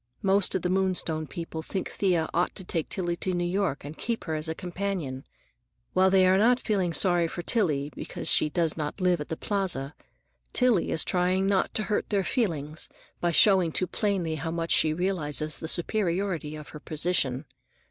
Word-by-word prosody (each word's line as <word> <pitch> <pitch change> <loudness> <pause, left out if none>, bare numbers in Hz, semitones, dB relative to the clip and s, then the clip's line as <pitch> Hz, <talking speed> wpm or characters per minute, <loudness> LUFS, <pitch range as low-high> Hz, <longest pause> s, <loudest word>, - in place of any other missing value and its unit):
Most 195 0 +3
of 185 - -1
the 180 - 0
Moonstone 180 -5 0
people 165 +1 -6
think 190 +4 -4
Thea 175 -5 +1
ought 175 +1 0
to 190 - -4
take 165 -3 -3
Tillie 175 -3 0
to 185 0 -1
New 175 - 0
York 175 -5 -1
and 145 +2 -7
keep 230 +5 -3
her 160 - -3
as 155 +1 -2
a 160 - -2
companion. 175 -8 -4 0.7
While 190 +1 +4
they 190 -1 +5
are 205 +7 +5
feeling 200 -7 -1
sorry 175 0 +3
for 175 - -6
Tillie 150 -10 +1
because - - -6
she 150 - +4
does 165 0 +1
not 150 +3 -4
live 180 -3 +2
at 150 - -7
the 160 - -3
Plaza, 180 -9 -2 0.6
Tillie 245 -8 +3
is 160 - +1
trying 185 +1 +1
not 195 -1 +1
to 215 - +1
hurt 210 0 -1
their 200 -2 +1
feelings 160 - -2 0.3
by 175 - +1
showing 185 -1 +5
too 185 - +1
plainly 185 -4 -1
how 160 +3 -3
much 165 0 -2
she 155 - +5
realizes 155 -3 -1
the 160 - -5
superiority 175 -3 -1
of 150 -2 -9
her 150 - -9
position. 150 -4 0
175 Hz, 190 wpm, -27 LUFS, 160-190 Hz, 0.7 s, they